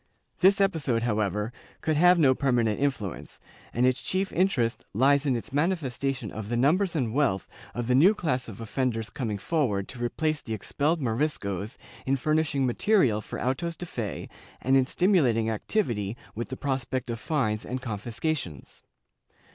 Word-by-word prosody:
This 195 +2 +5
episode, 160 -12 +1
however 105 -1 0 0.3
could 155 - +1
have 180 +3 +6
no 140 -6 +5
permanent 120 -5 +1
influence 130 -10 -3 0.3
and 120 +2 +2
its 130 0 +2
chief 190 +1 -1
interest 135 -11 +1
lies 140 +4 +4
in 130 - +2
its 115 - -6
manifestation 140 - -1
of 110 -1 -6
the 120 - 0
numbers 170 +8 +2
and 120 -7 0
wealth 130 -10 +1 0.3
of 120 0 -2
the 125 - +2
new 175 +12 +6
class 130 -9 -1
of 110 -2 -9
offenders 115 0 -2
coming 115 -8 -3
forward 105 -6 0
to 120 -2 -6
replace 155 +5 -1
the 110 - -4
expelled 150 - -1
Moriscos 110 - -2 0.3
in 135 - +3
furnishing 150 -1 +1
material 125 - +2
for - - -7
autos 165 +8 -1
de 175 - -6
fe 115 - -5 0.3
and 135 +1 +2
in 130 -1 +4
stimulating 130 - +2
activity 110 - -1 0.2
with 115 +2 -5
the 130 - -5
prospect 130 -2 -2
of 115 - -4
fines 110 -7 0
and 130 +1 -5
confiscations. 115 - -4
130 Hz, 160 wpm, -27 LUFS, 115-155 Hz, 0.3 s, have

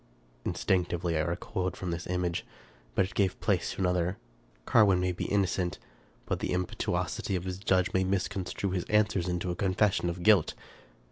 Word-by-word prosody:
Instinctively 85 -2 0
I 80 - +2
recoiled 90 +2 -2
from 90 -2 -3
this 85 +1 -4
image; 90 -1 -1 0.5
but 95 - +3
it 95 - -9
gave 95 -3 +1
place - - 0
to - - -5
another. 90 +1 +1 0.5
Carwin 100 -5 +5
may 90 0 +1
be 90 - -4
innocent, 95 -3 0 0.5
but - - -1
the - - -1
impetuosity 90 +1 -1
of 90 - -2
his 95 0 -4
judge 95 -2 +2
may 95 - +3
misconstrue 95 0 -1
his 90 -2 -1
answers 105 -4 +2
into 90 0 -1
a - - -3
confession 95 -1 +1
of 85 +1 -4
guilt. 100 -6 +5
90 Hz, 165 wpm, -29 LUFS, 90-95 Hz, 0.5 s, Carwin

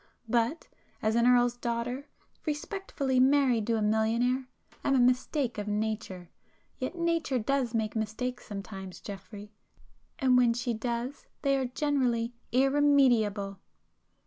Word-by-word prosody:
But 235 +7 0 0.4
as 220 0 +2
an 235 +1 +3
Earl's 245 -1 +4
daughter, 245 +3 -3 0.4
respectably 295 -4 -1
married 260 -4 +4
to 230 -1 +2
a 215 - 0
millionaire, 230 +4 +1 0.4
am 275 - +2
a - - +4
mistake 250 0 +1
of 205 - -4
nature. 210 -4 -3 0.5
Yet 255 +7 -3
nature 335 -5 0
does 250 0 0
make 220 -1 -1
mistakes 220 +4 -3
sometimes 195 -2 -7
Geoffrey, 205 +1 -9 0.7
and 255 -2 +4
when 240 -2 +4
she 240 0 -1
does 235 +4 -4 0.2
they 275 -1 +3
are 265 -1 0
generally 250 -4 0 0.2
irremediable!" 250 -7 +3
245 Hz, 125 wpm, -29 LUFS, 220-265 Hz, 0.7 s, Earl's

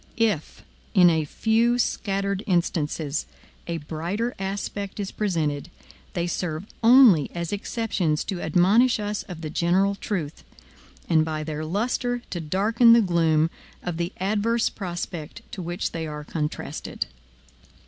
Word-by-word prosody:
If, 215 -9 0 0.3
in 180 -3 +7
a 160 -2 +1
few 230 +8 +2
scattered 200 -4 -1
instances, 160 -4 0 0.4
a 170 -1 -2
brighter 170 - -3
aspect 200 +1 -4
is 200 -2 -3
presented, 165 -7 -1 0.4
they 170 -1 -1
serve 175 0 -3 0.2
only 230 - +7
as 170 +2 -3
exceptions 200 -7 -1
to 190 -4 -4
admonish 200 +10 +4
us 210 0 -2
of 175 -3 -9
the 155 -2 -5
general 185 +5 +2
truth; 180 -7 -4 0.6
and 160 -2 +4
by 155 -1 -3
their 155 0 -4
lustre 240 +7 -1
to 175 - -2
darken 215 +9 +4
the 235 - +7
gloom 165 -4 +2 0.3
of 175 -2 -3
the 170 +1 -2
adverse 215 +4 +1
prospect 175 0 -6
to 190 - -5
which 175 +1 -3
they 160 -1 -4
are 150 0 -6
contrasted. 150 0 -4
180 Hz, 135 wpm, -25 LUFS, 160-210 Hz, 0.6 s, in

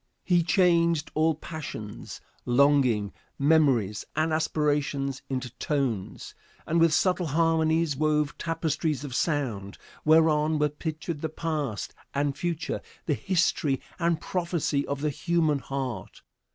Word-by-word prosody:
He 175 -2 +3
changed 170 -3 +2
all 160 +1 +2
passions, 150 -10 -7 0.2
longing, 125 -5 +3 0.2
memories 135 -9 +3
and 155 0 +1
aspirations 145 -3 0
into 130 -2 -3
tones, 130 -10 -2 0.3
and 165 +2 +1
with 165 -1 +5
subtle 180 -1 +2
harmonies 160 0 +2
wove 150 0 +1
tapestries 160 -2 -1
of 140 -4 -6
sound, 120 - -1 0.3
whereon 155 -1 +4
were 150 0 +2
pictured 155 +1 -5
the 160 - -2
past 155 -8 -3 0.2
and 140 0 0
future, 170 0 -3 0.2
the 155 - +1
history 155 -5 +1 0.2
and 170 -2 +1
prophecy 170 -5 -1
of 140 0 -3
the 150 0 0
human 160 -2 +1
heart. 135 -3 -5
150 Hz, 120 wpm, -27 LUFS, 140-165 Hz, 0.3 s, with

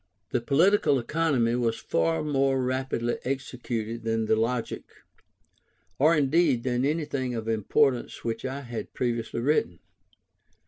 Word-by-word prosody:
The 125 - 0
Political 155 - +3
Economy 130 -3 +1
was 120 -2 0
far 80 0 0
more 135 -2 +1
rapidly 130 -2 -1
executed 120 -4 -4
than 115 0 0
the 110 - +3
Logic, 115 +2 -1 1.2
or 155 +4 +5
indeed 145 -3 +2
than 125 -1 0
anything 140 -4 -1
of 110 -1 -4
importance 120 +4 +1
which 115 -1 -3
I 135 +2 -4
had 120 -4 -7
previously 115 -2 -2
written. 120 - +1
125 Hz, 125 wpm, -27 LUFS, 115-140 Hz, 1.2 s, or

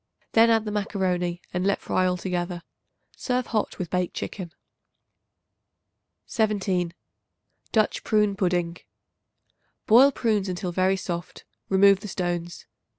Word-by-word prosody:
Then 230 +1 +5
add 225 -1 +3
the 210 - -3
macaroni, 180 -4 -1
and 180 0 -1
let 200 +1 +1
fry 185 - 0
altogether. 180 -1 -2 0.5
Serve 250 -1 -1
hot 220 -4 -2
with 175 -3 -5
baked 180 -1 -1
chicken. 180 -5 -5 1.7
17. 190 -5 0 0.8
Dutch 215 -2 +1
Prune 210 -2 +2
Pudding. 175 -3 0 1.1
Boil 255 +6 +7
prunes 215 -6 0
until 180 0 -3
very 185 +2 +2
soft; 175 -2 -6 0.2
remove 195 0 +5
the 210 - -8
stones. 175 -2 -3
190 Hz, 115 wpm, -25 LUFS, 175-210 Hz, 1.7 s, Boil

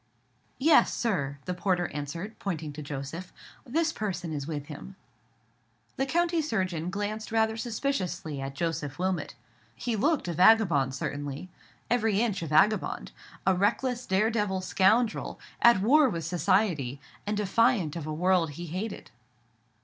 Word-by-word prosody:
"Yes, 305 +3 +5
sir," 145 - -1
the 180 - -2
porter 180 -1 0
answered, 160 +9 -6
pointing 160 -6 -4
to 155 - -7
Joseph; 145 +5 -6 0.4
"this 325 +5 +1
person 180 -6 -3
is 145 -2 -4
with 150 -3 -4
him." 160 +6 -9 1.0
The 270 - -1
country 340 +2 +2
surgeon 185 - -1
glanced 205 +3 -4
rather 220 0 +2
suspiciously 220 - -2
at 135 0 -5
Joseph 150 -3 -2
Wilmot. 180 -6 -2 0.4
He 235 - -2
looked 290 - +1
a 170 - -1
vagabond, 170 - +4
certainly—every 180 - -3
inch 220 -5 0
a 165 - -3
vagabond; 155 - +2 0.3
a 190 - +5
reckless, 240 +6 0
dare 200 +4 +2
devil 210 -4 0
scoundrel, 215 +5 +2 0.2
at 235 -5 +6
war 275 +6 +5
with 165 -7 -3
society, 165 - +1 0.3
and 210 0 0
defiant 210 - +2
of 160 -3 -5
a - - -3
world 175 0 +2
he 170 +4 -6
hated. 190 +6 -5
185 Hz, 140 wpm, -28 LUFS, 155-220 Hz, 1.0 s, at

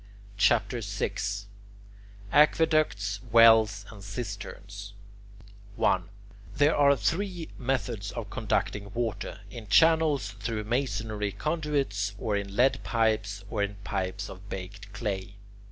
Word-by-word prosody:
CHAPTER 115 +2 +3
VI 100 -2 -2 1.2
AQUEDUCTS, 150 -10 +3
WELLS, 110 -3 +6
AND 100 -3 -12
CISTERNS 100 -1 -7 0.8
1. - - +1 0.5
There 145 +3 +4
are 140 -1 +5
three 175 +2 -2
methods 120 -5 -2
of 115 -4 -6
conducting 105 -3 -1
water, 115 -2 -3
in 115 -1 -9
channels 155 -2 +4
through 110 +1 -2
masonry 110 -3 -1
conduits, 140 - -1
or 110 -1 -1
in 100 -1 -3
lead 135 +3 +3
pipes, 110 -4 0
or 105 - -1
in 100 0 -1
pipes 95 +1 -3
of 95 +2 -11
baked 100 +2 -7
clay. 100 -2 -4
110 Hz, 110 wpm, -28 LUFS, 100-130 Hz, 1.2 s, WELLS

